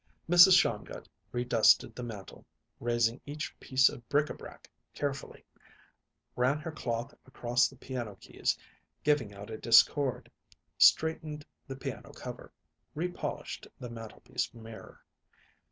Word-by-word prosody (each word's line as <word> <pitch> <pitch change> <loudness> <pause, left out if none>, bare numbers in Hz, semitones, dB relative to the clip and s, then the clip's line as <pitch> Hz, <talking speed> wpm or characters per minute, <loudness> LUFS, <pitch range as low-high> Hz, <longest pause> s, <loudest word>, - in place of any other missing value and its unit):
Mrs. 175 +2 +9
Shongut - - -2 0.2
redusted 120 -2 +4
the - - -7
mantel, 110 -5 -8 0.4
raising 120 +1 +1
each 145 +1 -5
piece 130 0 +4
of 120 - -5
bric 145 +1 +2
a - - -3
brac - - -12 0.3
carefully; 140 -1 -4 0.9
ran 130 +4 +2
her 155 +2 -6
cloth 120 -3 -4
across 120 -1 +1
the 135 - -14
piano 120 -5 -6
keys, - - -2 0.5
giving 145 -8 +2
out 100 +2 -10
a 110 - -6
discord; 125 +3 +4 0.5
straightened 155 -2 +3 0.2
the 135 - -6
piano 135 - -7
cover; - - -9 0.4
repolished 175 +3 -4
the 120 -1 -7
mantelpiece 115 -2 -5
mirror. 110 -1 -12
125 Hz, 120 wpm, -31 LUFS, 115-145 Hz, 0.9 s, Mrs